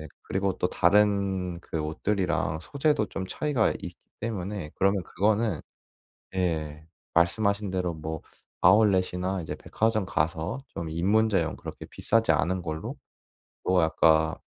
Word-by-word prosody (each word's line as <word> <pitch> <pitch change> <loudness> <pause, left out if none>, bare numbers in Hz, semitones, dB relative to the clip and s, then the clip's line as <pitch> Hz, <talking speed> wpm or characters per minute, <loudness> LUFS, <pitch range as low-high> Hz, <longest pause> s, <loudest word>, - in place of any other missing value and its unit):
네. 80 - -7 0.2
그리고 95 0 -1
또 90 - +1
다른 95 -2 +2
그 80 - -4
옷들이랑 80 -1 -1
소재도 140 - +1
좀 95 -1 -5
차이가 130 +2 +1
있기 - - -8 0.2
때문에 100 -6 -4
그러면 100 -1 +2
그거는 105 -3 +1 0.8
예. 80 -4 -2 0.3
말씀하신 100 +3 +2
대로 90 -3 -1
뭐 80 0 -5 0.4
아울렛이나 95 -3 +3
이제 80 - -5
백화점 110 -2 0
가서 85 - -1
좀 85 -7 -6
입문자용 95 0 +2
그렇게 - - -9
비싸지 115 -5 +2
않은 85 +5 +1
걸로 80 -2 -4 0.7
또 95 0 +3
아까 80 0 +3
95 Hz, 280 characters per minute, -27 LUFS, 80-105 Hz, 0.8 s, 아울렛이나